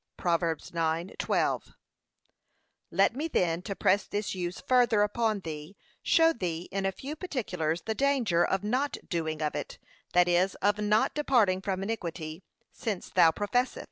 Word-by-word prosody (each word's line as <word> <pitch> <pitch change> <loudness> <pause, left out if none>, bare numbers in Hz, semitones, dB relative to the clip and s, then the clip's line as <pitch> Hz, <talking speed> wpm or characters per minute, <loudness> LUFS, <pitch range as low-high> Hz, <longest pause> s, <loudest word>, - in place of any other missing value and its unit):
(Prov. 170 -2 +1
9:12) 165 +1 -1 1.1
Let 195 +6 +3
me 300 +4 -2
then, 170 - 0
to 200 +1 -5
press 195 +2 +2
this 205 0 -2
use 180 -1 -4
further 245 -4 +3
upon 215 -1 0
thee, 155 +2 -7 0.2
show 330 0 +4
thee 175 - -4
in 195 0 -1
a - - 0
few 275 +9 -7
particulars 180 - -2
the 220 - -1
danger 240 -10 +2
of 190 +1 0
not 255 +7 0
doing 160 -3 -2
of 150 - -1
it, - - -5 0.4
that 180 0 +5
is, 180 +2 +2
of 205 +1 +1
not 210 +1 +2
departing 230 -11 +2
from 190 -1 -2
iniquity, 170 -6 -4 0.3
since 205 -5 -4
thou 165 - +6
professest. 225 +9 0
195 Hz, 150 wpm, -29 LUFS, 170-225 Hz, 1.1 s, thou